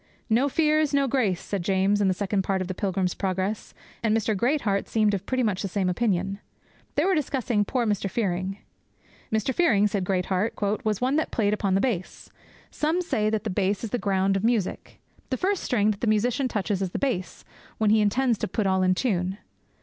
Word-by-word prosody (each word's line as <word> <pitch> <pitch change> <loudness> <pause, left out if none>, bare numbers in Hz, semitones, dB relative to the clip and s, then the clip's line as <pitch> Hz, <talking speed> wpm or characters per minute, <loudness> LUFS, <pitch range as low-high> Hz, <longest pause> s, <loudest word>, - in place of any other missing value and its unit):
'No 255 +6 +3
fears, 305 0 +2
no 280 -1 +3
grace!' 225 -9 +1
said 200 -3 -4
James, 195 +3 +2
in 200 - +3
the 190 - +3
second 200 0 0
part 190 0 -1
of 185 - -3
the 185 - -3
Pilgrim's 185 -1 -1
Progress, 190 +2 -3 0.3
and 225 -1 +2
Mr. 220 -1 0
Greatheart 225 -3 0
seemed 215 -2 +2
of 200 0 -3
pretty 255 -1 0
much 205 -5 0
the 200 - -2
same 190 -1 -1
opinion. 195 -1 0 0.6
They - - +2
were 385 - +3
discussing 255 - 0
poor 245 +3 0
Mr. 205 -2 0
Fearing. 190 -2 -2 0.7
'Mr. 220 +4 0
Fearing,' 225 - +3
said 200 -2 0
Greatheart, 185 +3 0 0.3
'was 215 -1 -1
one 260 +4 +2
that 315 - 0
played 210 -2 +1
upon 200 -2 0
the 195 - +2
bass. 205 -8 -3 0.4
Some 315 +4 0
say 215 -11 0
that 215 -1 -1
the 215 - -2
bass 195 +2 0
is 225 - -4
the 245 - 0
ground 195 -1 +1
of 195 - -1
music. 225 -5 -1 0.3
The 260 - -1
first 385 +4 0
string 215 -4 +2
that 205 - -6
the 235 - 0
musician 240 +5 +2
touches 205 -4 -2
is 190 - -1
the - - -4
bass, 240 -10 -3 0.3
when 215 -1 +2
he 215 0 +5
intends 235 +2 +2
to - - -1
put 210 +3 -2
all 190 -1 +2
in 185 0 +3
tune. 190 -4 -1
210 Hz, 210 wpm, -25 LUFS, 190-240 Hz, 0.7 s, he